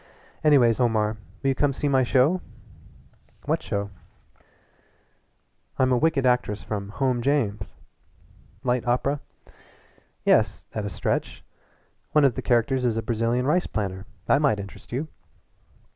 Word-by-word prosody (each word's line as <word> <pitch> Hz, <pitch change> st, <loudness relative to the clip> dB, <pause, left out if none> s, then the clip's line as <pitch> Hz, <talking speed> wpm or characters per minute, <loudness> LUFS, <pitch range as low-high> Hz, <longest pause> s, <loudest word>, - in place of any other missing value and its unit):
"Anyways, 130 Hz, -7 st, +5 dB
Omar, 110 Hz, -3 st, +1 dB, 0.3 s
will 135 Hz, -, +2 dB
you -, -, +3 dB
come 145 Hz, +2 st, +2 dB
and 135 Hz, -, -3 dB
see 145 Hz, -, -1 dB
my 135 Hz, -2 st, +3 dB
show?" 135 Hz, +8 st, +3 dB, 1.0 s
"What -, -, 0 dB
show?" 100 Hz, 0 st, -3 dB, 1.9 s
"I'm 130 Hz, 0 st, +3 dB
a 125 Hz, -, +4 dB
wicked 155 Hz, -1 st, +2 dB
actress 125 Hz, -4 st, +1 dB
from 100 Hz, -2 st, -4 dB
'Home 125 Hz, +2 st, 0 dB
James'!" 115 Hz, -7 st, -1 dB, 0.9 s
"Light 125 Hz, -1 st, 0 dB
opera?" 135 Hz, +4 st, +1 dB, 1.1 s
"Yes -, -, +3 dB
at 105 Hz, -2 st, -3 dB
a -, -, -2 dB
stretch. -, -, -3 dB, 0.7 s
One 150 Hz, -2 st, +5 dB
of 135 Hz, -, +3 dB
the -, -, -4 dB
characters 125 Hz, +2 st, +1 dB
is 115 Hz, -3 st, +1 dB
a 115 Hz, -, -2 dB
Brazilian 115 Hz, +2 st, 0 dB
rice 175 Hz, +6 st, +2 dB
planter. 95 Hz, -2 st, -4 dB, 0.2 s
That 140 Hz, -, +3 dB
might 135 Hz, -9 st, +2 dB
interest 100 Hz, -1 st, -10 dB
you." 135 Hz, +6 st, -2 dB
125 Hz, 140 wpm, -25 LUFS, 110-135 Hz, 1.9 s, Anyways